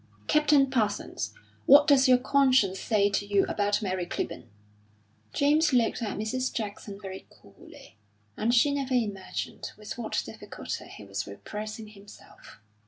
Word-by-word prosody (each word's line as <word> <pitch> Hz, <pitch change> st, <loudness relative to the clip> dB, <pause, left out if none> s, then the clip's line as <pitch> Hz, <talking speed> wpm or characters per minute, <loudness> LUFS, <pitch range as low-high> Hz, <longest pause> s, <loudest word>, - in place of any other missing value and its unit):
"Captain 295 Hz, -2 st, +4 dB
Parsons, 220 Hz, -6 st, -1 dB, 0.4 s
what 285 Hz, +2 st, +8 dB
does 280 Hz, -2 st, +5 dB
your 255 Hz, -1 st, +6 dB
conscience 255 Hz, -7 st, +3 dB
say 205 Hz, -2 st, +2 dB
to 205 Hz, 0 st, 0 dB
you 200 Hz, -1 st, +2 dB
about 205 Hz, +1 st, 0 dB
Mary 185 Hz, -2 st, -2 dB
Clibborn?" 120 Hz, -, -4 dB, 0.8 s
James 300 Hz, +1 st, +3 dB
looked 240 Hz, -2 st, +2 dB
at 215 Hz, -3 st, -3 dB
Mrs. 255 Hz, +5 st, -2 dB
Jackson 205 Hz, -2 st, -5 dB
very 190 Hz, -2 st, -8 dB
coolly, 110 Hz, -, -17 dB, 0.4 s
and 225 Hz, +2 st, 0 dB
she 250 Hz, +4 st, +4 dB
never 270 Hz, -2 st, -1 dB
imagined 205 Hz, -6 st, -3 dB
with 215 Hz, +3 st, -8 dB
what 230 Hz, -, -2 dB
difficulty -, -, -7 dB
he -, -, -11 dB
was -, -, -4 dB
repressing 215 Hz, +1 st, -7 dB
himself. 200 Hz, -, -15 dB
220 Hz, 140 wpm, -28 LUFS, 205-265 Hz, 0.8 s, what